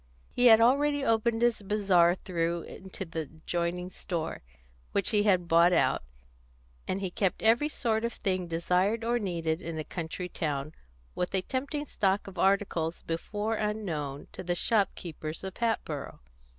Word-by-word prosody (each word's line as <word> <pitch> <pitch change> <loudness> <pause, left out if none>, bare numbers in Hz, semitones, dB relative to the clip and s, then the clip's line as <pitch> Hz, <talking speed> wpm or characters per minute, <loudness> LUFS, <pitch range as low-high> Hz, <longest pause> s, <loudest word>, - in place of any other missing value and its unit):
He 245 - +4
had 225 -1 +9
already 280 +4 +3
opened 225 0 +2
his 240 -3 +2
bazaar 190 -4 +3
through 170 -2 -2
into 190 0 -8
the 165 -1 -5
adjoining 170 +4 -3
store, 165 -3 -4 0.5
which 200 - 0
he 210 -2 +3
had 185 -4 +3
bought 170 +2 +5
out, - - +3 0.9
and 195 - -2
he 190 -2 -2
kept 190 0 -1
every 235 +7 +4
sort 225 -6 0
of 235 0 -1
thing 185 -2 -1
desired 180 +6 +1
or 240 +1 +1
needed 170 -4 -1
in 165 -2 -5
a 155 - -2
country 170 +2 -5
town, 150 -3 -3 0.4
with 180 +2 -2
a 185 - +1
tempting 280 +5 -3
stock 195 -6 0
of 190 -3 -9
articles 190 -4 +1
before 205 +7 -2
unknown 170 -11 -3
to - - -7
the 175 -1 -1
shopkeepers 175 -7 -1
of 190 -1 -6
Hatboro'. 225 -11 -2
185 Hz, 155 wpm, -29 LUFS, 170-220 Hz, 0.9 s, had